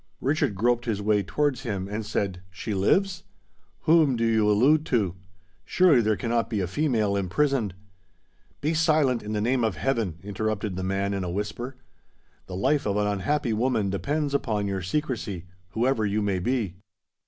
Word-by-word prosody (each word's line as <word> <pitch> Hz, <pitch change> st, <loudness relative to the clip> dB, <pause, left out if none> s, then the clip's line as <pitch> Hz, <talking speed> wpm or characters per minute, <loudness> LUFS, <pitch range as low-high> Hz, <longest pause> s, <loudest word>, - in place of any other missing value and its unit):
Richard 135 Hz, -7 st, 0 dB
groped 120 Hz, +4 st, +1 dB
his 110 Hz, -4 st, -1 dB
way 105 Hz, 0 st, +2 dB
towards 135 Hz, +5 st, 0 dB
him, 100 Hz, -7 st, -3 dB
and 105 Hz, +2 st, -4 dB
said, 100 Hz, -3 st, -2 dB
"She 95 Hz, +4 st, -5 dB
lives? 185 Hz, -, +2 dB, 0.6 s
whom 155 Hz, -5 st, +4 dB
do 115 Hz, 0 st, 0 dB
you 110 Hz, -2 st, +3 dB
allude 135 Hz, +9 st, +4 dB
to? 105 Hz, -8 st, +1 dB, 0.5 s
Surely 165 Hz, -, +4 dB
there 110 Hz, -1 st, +2 dB
cannot 115 Hz, 0 st, 0 dB
be 110 Hz, -3 st, -1 dB
a 95 Hz, -, 0 dB
female 110 Hz, -, 0 dB
imprisoned——" 100 Hz, +2 st, 0 dB, 0.9 s
"Be 155 Hz, +3 st, +1 dB
silent, 155 Hz, -6 st, +2 dB
in 105 Hz, +1 st, -5 dB
the 105 Hz, -, 0 dB
name 125 Hz, +2 st, +1 dB
of 110 Hz, -5 st, 0 dB
heaven!" 105 Hz, -, -1 dB
interrupted 105 Hz, 0 st, -2 dB
the 95 Hz, -, -3 dB
man, 100 Hz, +1 st, -1 dB
in 95 Hz, -1 st, -2 dB
a 90 Hz, -, -3 dB
whisper. 105 Hz, +7 st, -4 dB, 0.7 s
"The 90 Hz, -, -6 dB
life 135 Hz, +6 st, +1 dB
of 100 Hz, 0 st, 0 dB
an 105 Hz, -, +1 dB
unhappy 105 Hz, +5 st, 0 dB
woman 110 Hz, -3 st, +1 dB
depends 145 Hz, +8 st, -1 dB
upon 110 Hz, -7 st, 0 dB
your 100 Hz, -1 st, -2 dB
secrecy—whoever 105 Hz, -, -2 dB
you 105 Hz, +1 st, 0 dB
may 100 Hz, -2 st, 0 dB
be." 105 Hz, -3 st, -1 dB
110 Hz, 165 wpm, -26 LUFS, 100-130 Hz, 0.9 s, whom